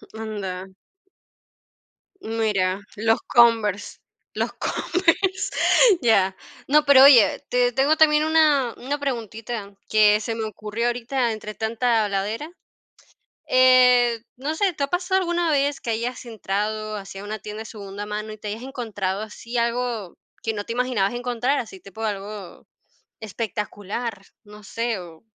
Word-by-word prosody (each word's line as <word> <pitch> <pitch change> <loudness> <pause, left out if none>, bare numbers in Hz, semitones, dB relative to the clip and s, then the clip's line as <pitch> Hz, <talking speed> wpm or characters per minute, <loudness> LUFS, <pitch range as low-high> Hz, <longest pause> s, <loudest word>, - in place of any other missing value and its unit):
Mm, - - -8
anda. 195 -4 -5 1.5
Mira, 205 -4 -1
los 225 +2 +2
Converse, 225 -4 +2 0.3
los - - -2
Converse. 370 +2 0 0.5
Ya. 195 -5 +3 0.3
No, 300 +2 +4
pero 275 -2 +8
oye, 260 -6 +6
te 245 0 +2
tengo 280 +4 +3
también 305 -1 +4
una 300 -6 +3
una 285 +3 -3
preguntita 225 -5 -5 0.2
que 210 -1 +5
se 225 +1 -4
me 225 - -3
ocurrió 215 +2 -3
ahorita 240 0 -1
entre 215 -1 -6
tanta 230 +1 0
habladera. 205 +9 -3 1.0
Eh, 250 -2 +5 0.2
no 285 +4 -3
sé, 370 +2 +1
¿te 285 - -3
ha - - 0
pasado 370 +3 0
alguna 345 -1 0
vez 285 0 +1
que 235 - -5
hayas 235 +4 -3
entrado 215 0 -3
así 195 -1 -8
a 195 - -7
una 215 +1 -5
tienda 210 +2 -7
de - - -8
segunda 205 -1 -8
mano 210 +1 -5
y 215 - -9
te 210 0 -7
hayas 220 +3 -5
encontrado 215 -7 -4
así 230 +3 -7
algo 235 -4 -2 0.3
que 225 - -1
no 205 -1 -5
te 230 - -4
imaginabas 245 -4 0
encontrar, 245 +3 -1
así 215 -5 -7
tipo 200 +4 -10
algo 205 -2 -6 0.5
espectacular, 210 0 -5 0.2
no 210 0 -14
sé, 230 0 -2
o 170 -1 -12
225 Hz, 145 wpm, -23 LUFS, 210-255 Hz, 1.5 s, pero